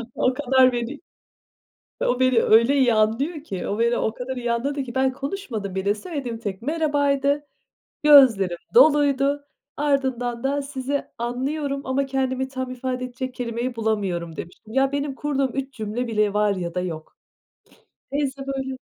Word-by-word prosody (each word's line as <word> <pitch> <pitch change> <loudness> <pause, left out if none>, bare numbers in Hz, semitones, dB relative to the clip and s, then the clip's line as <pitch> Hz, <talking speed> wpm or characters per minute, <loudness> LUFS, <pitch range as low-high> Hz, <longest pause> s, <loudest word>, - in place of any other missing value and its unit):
o 255 - +2
kadar 260 -1 +4
belli. 240 +4 -4 1.0
O 245 - +1
beni 255 -3 +4
öyle 230 +5 +5
iyi 250 -4 +4
anlıyor 265 +9 +1
ki 190 - -5
o 205 - -2
beni 235 +1 +2
o 220 - 0
kadar 255 +2 -5
iyi 240 -1 -1
anladı 275 +4 -1
ki 245 -1 -9
ben 265 0 +2
konuşmadım 260 - -5
bile 200 +2 +1
söylediğim 255 - -5
tek 205 -3 -5
merhabaydı, 290 -1 +1 0.6
gözlerim 240 -12 +6 0.2
doluydu. 285 - +4 0.3
Ardından 260 -4 0
da 280 +1 0
"Sizi 275 0 -3
anlıyorum 275 +4 -2
ama 265 +1 0
kendimi 265 -1 -1
tam 260 -1 -5
ifade 255 0 -3
edecek 255 +1 -5
kelimeyi 240 0 -3
bulamıyorum." 195 -7 -2
demiştim. 195 +7 -9
Ya, 270 +1 +3
benim 285 -1 -2
kurduğum 275 -2 -1
3 270 0 -3
cümle 220 +2 -3
bile 215 -3 +1
var 210 -1 +2
ya 175 -2 -4
da 180 - 0
yok. 160 -3 -6 1.0
Teyze 275 -1 -2
böyle 265 -1 -3
260 Hz, 150 wpm, -23 LUFS, 230-275 Hz, 1.0 s, gözlerim